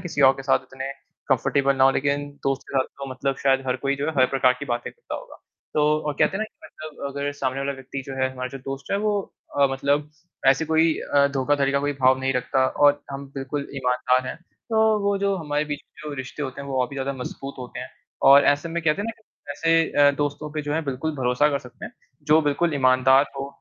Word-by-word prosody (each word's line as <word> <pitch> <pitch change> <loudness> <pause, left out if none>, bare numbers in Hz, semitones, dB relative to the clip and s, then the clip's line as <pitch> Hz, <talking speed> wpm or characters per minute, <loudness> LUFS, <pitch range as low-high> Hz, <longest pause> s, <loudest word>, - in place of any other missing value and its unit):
किसी 165 -5 -3
और - - +6
के 135 - -8
साथ 135 - +3
इतने 135 +1 -5 0.4
कम्फर्टेबल 135 +1 +2
ना 130 - +5
हो, 135 - +7
लेकिन 145 +1 0 0.2
दोस्त 135 0 0
के 135 - 0
साथ 130 - +2
तो 135 -1 -6
मतलब 135 +1 -2
शायद 135 -1 +2
हर 125 - 0
कोई 140 0 +1
जो 145 +2 -2
है, 160 - -1
हर 130 - +6
प्रकार 130 -2 +4
की - - -5
बातें 120 0 -3
करता 475 - -9
होगा। - - -9 0.4
तो 150 - +3 0.2
और 150 - 0
कहते 195 - +3
हैं - - -4
ना 220 - 0
कि 215 - -17
मतलब 155 -2 -8
अगर 140 +1 -3
सामने 135 -1 -2
वाला 140 0 -1
व्यक्ति 135 0 -7
जो 135 - -6
है 130 - +2
हमारा 130 0 -4
जो 135 +1 -8
दोस्त 135 +1 -7
है - - +3
वो 205 -1 +2 0.4
अ, 140 - +7
मतलब 145 +2 0 0.4
ऐसे 135 +4 +5
कोई 160 +1 +3 0.2
अ, 140 0 +6
धोखाधड़ी 140 +1 +1
का 140 - +2
कोई 145 0 0
भाव 130 0 +5
नहीं 135 0 0
रखता 130 +1 +1
और 145 +1 +3
हम 140 0 -6
बिल्कुल 140 +1 -4
ईमानदार 125 0 +1
हैं - - -5 0.3
तो 220 - +2 0.3
वो 200 0 +2
जो 200 0 +1
हमारे 150 -2 -1
बीच 145 -1 -4
में 150 0 -11
जो - - -5
रिश्ते 130 +3 -6
होते 130 0 -5
हैं, 140 - -7
वो 130 -1 0
और 125 - 0
भी - - -9
ज़्यादा 135 +1 -2
मज़बूत 135 +1 -7
होते 125 -1 -7
हैं - - -7 0.4
और 140 +1 +8
ऐसे 145 +4 -1
में 170 0 -3
कहते 160 +5 +1
हैं - - -5
ना - - -1
कि 145 -8 -15
ऐसे 165 +2 +2 0.2
अ, - - +6
दोस्तों 145 +1 -2
पे 155 -1 -3
जो 145 - -3
है 160 - +1
बिल्कुल 140 +3 -3
भरोसा 130 +3 +2
कर 140 - 0
सकते 125 -2 -12
हैं, - - -8 0.3
जो 150 +2 +5
बिल्कुल 150 +2 +1
ईमानदार 130 +1 +5
हो 135 - -3
140 Hz, 250 wpm, -24 LUFS, 135-150 Hz, 0.4 s, और